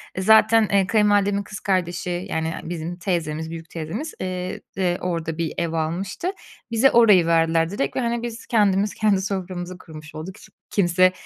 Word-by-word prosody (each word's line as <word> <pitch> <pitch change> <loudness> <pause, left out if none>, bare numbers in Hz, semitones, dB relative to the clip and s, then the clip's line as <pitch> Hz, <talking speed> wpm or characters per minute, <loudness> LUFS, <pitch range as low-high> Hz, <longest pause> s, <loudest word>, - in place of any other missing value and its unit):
e, 185 - -2
zaten, 220 +1 +5
eee, 195 -1 +3
kayınvalidemin 205 -2 +2
kız 210 +1 -8
kardeşi 180 0 -1
yani 160 -1 -1
bizim 170 +1 -5
teyzemiz, 160 -4 -2
büyük 165 0 -8
teyzemiz, 170 - -5
eee, 185 -1 -4 0.2
de 180 -2 +1
orada 165 -2 -3
bir 165 -2 -2
ev 170 -1 -1
almıştı. 180 - -2 0.4
Bize 240 +4 +4
orayı 210 -7 +6
verdiler 165 0 +3
direkt 155 -8 -2
ve, - - 0
hani, 235 -1 -1
biz 235 0 -6
kendimiz 205 -3 +2
kendi 205 -3 +2
soframızı 185 -2 -4
kurmuş 155 -3 -12
olduk. 170 +5 -7
S - - -15 0.2
kimse 185 -1 +3
185 Hz, 165 wpm, -23 LUFS, 165-205 Hz, 0.4 s, orayı